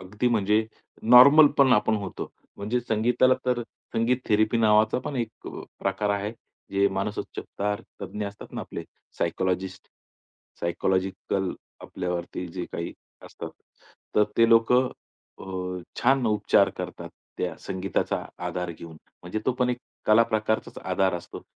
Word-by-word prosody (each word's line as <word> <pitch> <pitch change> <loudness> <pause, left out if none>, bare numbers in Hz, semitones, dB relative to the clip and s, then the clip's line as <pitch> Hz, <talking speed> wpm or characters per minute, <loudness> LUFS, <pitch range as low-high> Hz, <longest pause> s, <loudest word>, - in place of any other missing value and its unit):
अगदी 105 +6 -1
म्हणजे 110 -1 +2 0.4
नॉर्मल 140 +6 +9
पण 135 -2 +6
आपण 110 +1 +3
होतो. 100 -2 -5 0.3
म्हणजे 110 +5 -1
संगीताला 120 +3 +3
तर 120 -1 +1 0.3
संगीत 115 +3 +2
थेरपी 110 +2 +3
नावाचा 110 +1 +4
पण 140 - -3
एक 115 -2 -4
अ, - - -7 0.2
प्रकार 100 +2 0
आहे. 100 +2 -1 0.4
जे 100 0 +4
मानसोपचार 105 +1 -3 0.2
तज्ज्ञ 105 -1 -4
असतात 100 0 -10
ना - - -4
आपले - - -6 0.4
सायकॉलॉजिस्ट, 95 +2 -2 0.7
सायकॉलॉजिकल 95 +2 -1 0.3
आपल्यावरती 90 0 -4
जे 90 -2 -3
काही 85 - -4 0.3
असतं, - - -8 0.7
तर 105 - +7
ते 115 0 +5
लोकं 125 +3 +5 0.5
अ, 90 -1 -5 0.2
छान 130 0 +3
उपचार 105 -2 +4
करतात - - -6 0.3
त्या 90 -3 -2
संगीताचा 95 0 -2 0.2
आधार 90 0 -3
घेऊन. 80 -1 -10 0.3
म्हणजे 90 +5 -3
तो 130 - +3
पण 125 0 +3
एक 125 - -2 0.3
कलाप्रकारचाच 110 0 +2
आधार 95 -2 +1
असतो. 85 0 -7
105 Hz, 130 wpm, -26 LUFS, 95-115 Hz, 0.7 s, नॉर्मल